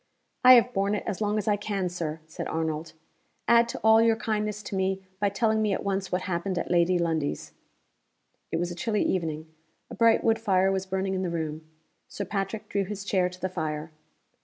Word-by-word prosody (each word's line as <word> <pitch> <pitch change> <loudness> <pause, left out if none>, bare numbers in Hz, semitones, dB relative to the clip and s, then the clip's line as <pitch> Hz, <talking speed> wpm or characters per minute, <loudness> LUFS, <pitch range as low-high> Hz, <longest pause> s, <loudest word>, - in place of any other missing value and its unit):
"I 255 0 +10
have 245 +1 +4
borne 200 +1 +1
it - - -3
as 205 -1 -4
long 210 0 +1
as 210 0 -2
I 205 -1 +3
can, 200 -2 -2
Sir," 165 -3 -4
said 160 - -6
Arnold. 160 0 -3 0.5
"Add 235 0 +5
to - - -5
all 220 0 +6
your 230 0 +4
kindness 210 -2 -2
to 200 - -5
me 190 0 -1 0.2
by 205 - +2
telling 220 +2 +1
me 210 -2 +1
at - - -3
once 195 -1 -2
what 180 +1 -1
happened 185 0 -2
at - - -3
Lady 175 +1 +3
Lundie's." 160 -4 -2 1.0
It - - 0
was 175 +1 -2
a - - -6
chilly 210 +4 0
evening. 160 -3 -2 0.4
A - - -5
bright 230 -1 +4
wood 225 -1 +2
fire 190 -3 +2
was 190 0 -2
burning 190 0 -1
in 185 - -1
the 185 - -1
room. 155 -1 -4 0.4
Sir 200 - -5
Patrick 200 +2 -3
drew 200 -1 0
his 200 0 -6
chair 185 -3 +1
to 180 0 -13
the 185 - -1
fire. 155 -3 -4
190 Hz, 210 wpm, -27 LUFS, 170-210 Hz, 1.0 s, I